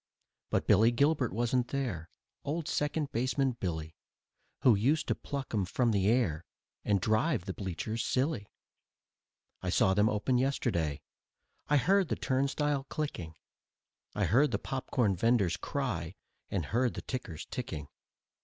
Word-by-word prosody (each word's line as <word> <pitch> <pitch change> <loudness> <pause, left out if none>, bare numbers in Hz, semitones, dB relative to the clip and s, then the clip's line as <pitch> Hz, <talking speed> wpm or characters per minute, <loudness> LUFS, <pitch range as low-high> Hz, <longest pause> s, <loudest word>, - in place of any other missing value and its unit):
But - - 0
Billy 105 +3 +6
Gilbert 140 0 +2
wasn't 120 +3 +1
there, 105 - -3 0.3
Old 155 +2 -2
Second 150 -1 -1
Baseman 130 +3 +1
Billy, 80 -3 -3 0.7
Who 125 - +6
used 140 +9 +2
to - - +4
pluck 140 -4 -6
'em 105 -3 +2
from 115 +6 +1
the 100 -2 +2
air 110 -9 +2 0.4
And 100 -1 +2
drive 110 - +1
the 95 - -3
bleachers 105 +4 -3
silly. 130 -5 0 1.1
I - - -2
saw 95 - +3
them 105 +2 +4
open 115 +4 +1
yesterday, 105 - 0 0.6
I 145 - +4
heard 190 +6 +3
the - - -1
turnstile 140 +1 0
clicking; 135 - -4 0.8
I 105 - +1
heard 130 - +4
the - - 0
popcorn 125 -6 -1
venders' 100 -3 +2
cry 90 - -3 0.3
and 90 -6 -1
heard 120 - 0
the - - -6
tickers 105 - -5
ticking. 75 -2 -4
120 Hz, 140 wpm, -31 LUFS, 95-140 Hz, 1.1 s, Billy